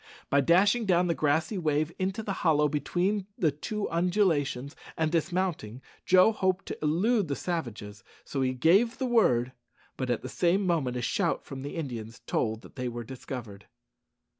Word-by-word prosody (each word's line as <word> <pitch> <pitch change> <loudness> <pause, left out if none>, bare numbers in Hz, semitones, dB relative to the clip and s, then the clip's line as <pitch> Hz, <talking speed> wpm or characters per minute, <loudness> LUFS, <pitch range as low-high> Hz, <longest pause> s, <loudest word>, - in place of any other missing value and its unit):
By 140 - +5
dashing 200 - +3
down 180 -1 +3
the 170 - +1
grassy 160 +6 0
wave 155 -1 0
into 190 +3 -2
the 200 - -2
hollow 150 -3 +3
between 180 +7 -1
the 160 -4 +2
two 205 +9 -4
undulations, 165 -7 +1 0.2
and 160 -1 +1
dismounting, 170 - -1 0.3
Joe 185 +4 +6
hoped 190 -3 0
to - - -4
elude 185 +7 +2
the 140 - -2
savages, 110 - -5 0.2
so 135 - -3
he 130 0 +1
gave 195 - +3
the 260 - -1
word; 130 - +3 0.5
but 130 -1 -3
at 120 - -1
the - - -4
same 185 +3 +1
moment 145 -9 0
a 120 - -3
shout - - 0
from 135 -1 -7
the 140 - -6
Indians 120 -8 -6
told 110 -1 -1
that - - -15
they 125 -1 -2
were 120 0 -6
discovered. 120 -4 -8
160 Hz, 170 wpm, -28 LUFS, 130-185 Hz, 0.5 s, Joe